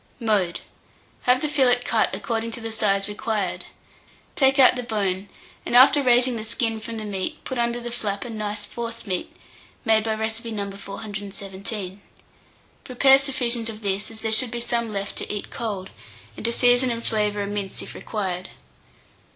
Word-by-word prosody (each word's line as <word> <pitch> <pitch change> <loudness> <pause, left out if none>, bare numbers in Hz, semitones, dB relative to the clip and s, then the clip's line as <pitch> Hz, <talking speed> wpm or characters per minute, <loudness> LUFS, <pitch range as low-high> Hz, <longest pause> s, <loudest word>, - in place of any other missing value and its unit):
Mode. 205 -7 +1 0.6
Have 255 +2 +4
the - - +2
fillet 260 -5 +3
cut 225 - +2
according 230 -2 -2
to 250 - -3
the 225 -1 -5
size 200 -3 +1
required; 210 -2 -2 0.7
take 270 -1 +4
out 260 -2 +8
the 250 - -2
bone, 200 -4 -1 0.3
and - - -2
after 265 +3 +8
raising 250 -1 +4
the 215 - -4
skin 225 0 -1
from 225 +1 -6
the 215 - -5
meat, 205 - -4
put 260 -2 -3
under 235 0 +1
the 240 0 -5
flap 205 -3 -2
a - - -6
nice 210 -1 -4
forcemeat, 230 -5 -4 0.5
made 220 -1 +4
by 220 -1 0
recipe 225 +1 -3
No. 200 -3 -3
417. 200 -1 -6 0.8
Prepare 270 +1 +6
sufficient 245 -4 -1
of 220 0 -8
this, 200 0 0
as 220 -1 -10
there 220 - -1
should 240 +3 +3
be 240 +1 -4
some 235 -1 -1
left 200 -1 -4
to - - -4
eat 210 -1 -4
cold, 205 -5 -4 0.4
and - - -8
to 235 - +3
season 245 +1 +4
and 230 -1 -3
flavour 210 -2 +1
a - - -3
mince 200 -1 -4
if - - -9
required. 185 -4 -4
220 Hz, 175 wpm, -24 LUFS, 205-240 Hz, 0.8 s, out